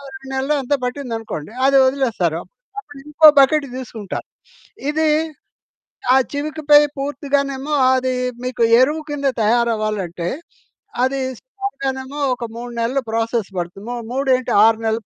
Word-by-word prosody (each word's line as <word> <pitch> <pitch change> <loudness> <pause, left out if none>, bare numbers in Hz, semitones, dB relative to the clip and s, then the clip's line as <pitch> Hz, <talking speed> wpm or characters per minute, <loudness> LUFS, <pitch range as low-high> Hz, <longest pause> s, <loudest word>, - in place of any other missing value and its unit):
2 265 0 -11
నెలలో 270 +3 0
ఎంతో 270 +2 0
పట్టిందనుకోండి. 230 - -5
అది 275 0 +5
ఒదిలేస్తారు. 230 - 0 0.4
అప్పుడింకో 300 -2 +2
బకెట్ 280 +2 +4
తీసుకుంటారు. 225 -6 -6 0.6
ఇది 315 +1 +1 1.1
ఆ - - +6 0.2
చివికపై 295 0 +3 0.2
పూర్తిగానేమో 280 0 -2 0.2
అది 255 0 0 0.3
మీకు 250 -2 -2 0.2
ఎరువు 300 +5 +2
కింద 285 -1 -2 0.2
తయారవ్వాలంటే, 215 -6 0 0.8
అది 270 +1 0 0.2
సుమారుగానేమో 280 - -5
ఒక 245 - -6
3 240 0 -7
నెళ్ళు 255 +4 0
ప్రాసెస్ 225 -1 -1
పడుతుంది. 175 +4 -6
ము 245 - -3 0.2
మూడేంటి 255 -1 +1
6 225 0 +3
నెళ్ళు 225 +1 0
260 Hz, 115 wpm, -19 LUFS, 230-285 Hz, 1.1 s, ఆ